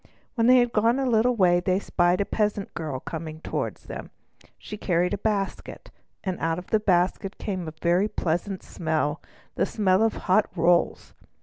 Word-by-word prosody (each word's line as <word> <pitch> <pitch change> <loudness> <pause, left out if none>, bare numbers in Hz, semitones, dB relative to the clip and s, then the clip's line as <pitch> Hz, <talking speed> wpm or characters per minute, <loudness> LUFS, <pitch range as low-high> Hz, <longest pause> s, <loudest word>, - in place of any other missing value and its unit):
When 230 -1 +2
they 255 +1 +7
had 240 -2 +2
gone 230 +4 +3
a 270 - 0
little 245 0 +3
way 180 -4 +4
they 185 +1 +1
spied 180 -1 +1
a - - 0
peasant 210 -2 -1
girl 150 -6 -4
coming 155 +1 -6
toward - - -3
them. - - -9 0.5
She 210 - -8
carried 180 -3 0
a - - 0
basket, 205 -2 -3 0.3
and 185 -3 -3
out 165 0 0
of 180 - -9
the 220 - +4
basket 190 0 +1
came 185 -5 -4
a 155 - -6
very 175 +4 +3
pleasant 180 +1 -2
smell—the 155 -2 -3
smell 195 -2 +2
of 225 -1 +3
hot 200 +2 +3
rolls. 170 0 +1
185 Hz, 175 wpm, -25 LUFS, 175-215 Hz, 0.5 s, they